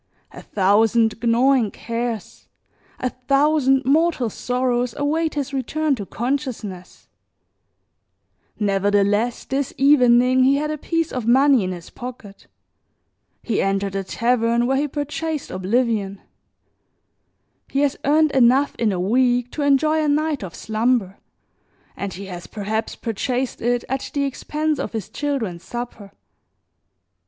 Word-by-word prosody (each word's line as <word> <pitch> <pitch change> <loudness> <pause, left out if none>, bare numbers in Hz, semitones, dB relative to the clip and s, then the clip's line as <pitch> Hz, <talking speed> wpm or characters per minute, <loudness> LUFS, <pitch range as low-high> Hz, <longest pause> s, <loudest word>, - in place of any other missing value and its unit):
A - - -10
thousand 220 +3 +2
gnawing 240 0 +3
cares, 230 -1 -5 0.5
a 255 - -1
thousand 275 +1 +2
mortal 290 -4 +2
sorrows 250 0 -1
await 310 +3 0
his 285 -1 -3
return 295 +3 0
to 205 -7 -5
consciousness; 235 -8 -4 1.5
nevertheless, 205 +3 +1
this 270 0 -2
evening 255 -2 +5
he 270 +2 +4
had 300 +2 -1
a 305 - -3
piece 330 +1 -1
of 250 -3 -3
money 265 -1 +5
in 185 - -2
his 175 -1 -9
pocket, 235 -5 -10 1.0
he 225 - 0
entered 195 0 -1
a 195 - -1
tavern 235 +3 +1
where 265 +2 +1
he 295 +2 0
purchased 295 +2 -4
oblivion; 200 0 -1 1.5
he 275 - -1
has 285 -1 +1
earned 305 +2 +3
enough 265 +2 +4
in 225 -3 +2
a 185 - -2
week 245 +5 +2
to 305 - -4
enjoy 305 +2 +3
a - - 0
night 300 -1 0
of 175 -4 -7
slumber 220 -3 0 0.8
and 200 -2 -5
he 195 +2 -7
has 175 -2 -8
perhaps 220 +1 -3
purchased 250 +3 -3
it 240 +1 0
at 265 +1 -3
the 285 - +1
expense 300 +3 -2
of - - -4
his 220 -5 -4
children's 240 -13 -3
supper. 240 -4 -7
245 Hz, 130 wpm, -21 LUFS, 215-280 Hz, 1.5 s, evening